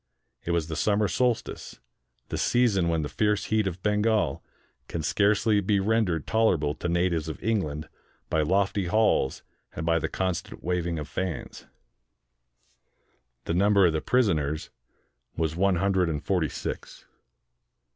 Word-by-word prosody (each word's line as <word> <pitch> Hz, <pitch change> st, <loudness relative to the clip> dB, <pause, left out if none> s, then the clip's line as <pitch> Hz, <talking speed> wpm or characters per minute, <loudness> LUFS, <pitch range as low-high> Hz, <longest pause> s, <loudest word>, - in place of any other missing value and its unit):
It -, -, -7 dB
was 85 Hz, -2 st, +1 dB
the 80 Hz, -, -4 dB
summer 105 Hz, +4 st, +2 dB
solstice, 125 Hz, +2 st, -2 dB, 0.5 s
the -, -, -3 dB
season 110 Hz, -8 st, +2 dB
when 80 Hz, -2 st, 0 dB
the -, -, -2 dB
fierce 105 Hz, +5 st, 0 dB
heat 110 Hz, -2 st, +2 dB
of 90 Hz, 0 st, -5 dB
Bengal 105 Hz, -7 st, +1 dB, 0.4 s
can 80 Hz, -, -4 dB
scarcely 105 Hz, +5 st, +2 dB
be 100 Hz, +1 st, +1 dB
rendered 95 Hz, -6 st, +1 dB
tolerable 90 Hz, -10 st, +2 dB
to 85 Hz, -, -4 dB
natives 85 Hz, -2 st, 0 dB
of 80 Hz, -, -7 dB
England 80 Hz, -9 st, -1 dB, 0.4 s
by 80 Hz, -, +1 dB
lofty 95 Hz, +3 st, +1 dB
halls 105 Hz, -9 st, +2 dB, 0.3 s
and 80 Hz, -, -4 dB
by 85 Hz, 0 st, +2 dB
the -, -, -2 dB
constant 95 Hz, -2 st, -3 dB
waving 85 Hz, -1 st, -1 dB
of 75 Hz, -2 st, -5 dB
fans. 95 Hz, -1 st, -5 dB, 1.8 s
The -, -, -1 dB
number 100 Hz, +2 st, +4 dB
of 85 Hz, -, +3 dB
the 80 Hz, -, -1 dB
prisoners 80 Hz, -, 0 dB, 0.7 s
was 80 Hz, -1 st, -1 dB
one 95 Hz, +1 st, +2 dB
hundred 95 Hz, -1 st, +1 dB
and 75 Hz, -1 st, -3 dB
forty 90 Hz, -6 st, +1 dB
six. -, -, -6 dB
90 Hz, 145 wpm, -27 LUFS, 80-105 Hz, 1.8 s, number